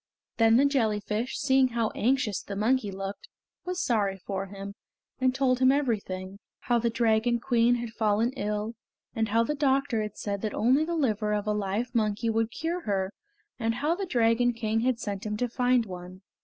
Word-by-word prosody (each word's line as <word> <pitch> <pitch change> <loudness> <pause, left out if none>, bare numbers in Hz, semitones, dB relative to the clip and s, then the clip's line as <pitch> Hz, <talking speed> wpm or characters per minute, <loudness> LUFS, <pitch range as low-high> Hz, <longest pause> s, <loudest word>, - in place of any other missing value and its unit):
Then 225 0 +5
the 275 - +5
jellyfish, 220 -3 0
seeing 265 -2 +3
how 230 -3 -1
anxious 245 -4 0
the 200 - -7
monkey 220 +2 +1
looked, 195 +1 -6 0.4
was 365 0 -3
sorry 205 -5 +1
for 195 +1 -4
him, 200 0 -8 0.5
and 255 0 +2
told 260 -2 +1
everything. 210 -8 0 0.2
How 240 -1 +1
the 235 0 +1
Dragon 230 0 +2
Queen 235 0 +3
had 240 -1 -4
fallen 220 +1 +1
ill, 210 -2 -3 0.4
and 225 0 0
how 225 +2 +3
the 265 - -1
doctor 275 -4 +1
had 210 0 -5
said 200 -1 -3
that 215 - -3
only 260 +7 +3
the 340 +1 -2
liver 215 -8 0
of 205 0 -2
a 210 - +1
live 210 +4 -2
monkey 220 0 +1
would 225 0 +1
cure 335 +7 -3
her, 195 -1 -1 0.5
and 225 -1 0
how 300 +6 +1
the 385 +2 -4
Dragon 240 -3 +2
King 225 -1 -1
had 250 +1 +1
sent 200 -3 -4
him 210 -1 -3
to 245 - 0
find 245 0 +2
one. 180 -1 -9
225 Hz, 185 wpm, -28 LUFS, 210-255 Hz, 0.5 s, Then